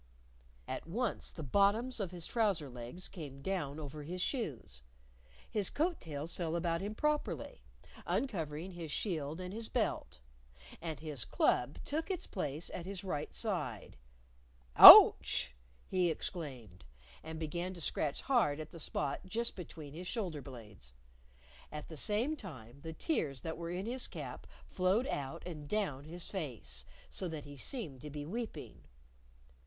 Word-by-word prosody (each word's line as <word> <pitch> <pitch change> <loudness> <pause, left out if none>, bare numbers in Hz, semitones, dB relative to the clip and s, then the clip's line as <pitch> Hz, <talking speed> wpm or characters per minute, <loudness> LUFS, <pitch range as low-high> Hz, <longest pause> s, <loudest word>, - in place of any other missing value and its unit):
At - - -5
once, 225 +6 -1
the 160 - -7
bottoms 205 - +3
of 195 -4 -1
his 175 -2 -7
trouser 200 - +1
legs 125 +9 -6
came 140 -6 -9
down 160 -6 -2
over 150 0 -6
his 175 +5 -5
shoes, 125 - -3 0.7
his 205 -3 +1
coat 330 +3 0
tails 155 0 -5
fell 170 -2 -2
about 170 -1 0
him 205 +2 -4
properly, 300 +4 -1 0.5
uncovering 170 - -2
his 170 -3 -7
shield 160 -3 -2
and 180 +1 -5
his 225 +1 -5
belt, - - -1 0.6
and 160 -3 -4
his 150 -6 -4
club 125 +4 +1
took 320 +5 -2
its 370 -2 -2
place 155 -4 -3
at 175 - -5
his 195 -1 -5
right 150 -6 -3
side. 150 - -3 0.8
"Ouch!" - - +11 0.3
he 180 -2 +2
exclaimed. 130 - -5 0.4
And 160 0 -7
began 170 +3 -3
to - - -9
scratch 150 -2 0
hard 220 - +2
at 155 0 -7
the 170 - -10
spot 145 -2 -2
just 230 +4 -2
between 155 -5 -8
his 175 +3 -7
shoulder 180 - -3
blades. 105 - -10 0.8
At 150 -1 -7
the 160 - -7
same 215 - +1
time, 140 - -10
the 160 +1 -6
tears 150 - -1
that 160 - -4
were 170 0 -5
in 180 +3 -3
his 250 +2 -3
cap - - -7 0.2
flowed 190 +7 +2
out 135 - -4
and 150 -5 -7
down 150 -10 -1
his 170 +2 -8
face. 110 - -5 0.3
So 185 - -1
that 155 -3 -5
he 145 0 -10
seemed 145 - -5
to 150 - -7
be 145 0 -5
weeping. 225 +7 -6
165 Hz, 155 wpm, -34 LUFS, 145-195 Hz, 0.8 s, Ouch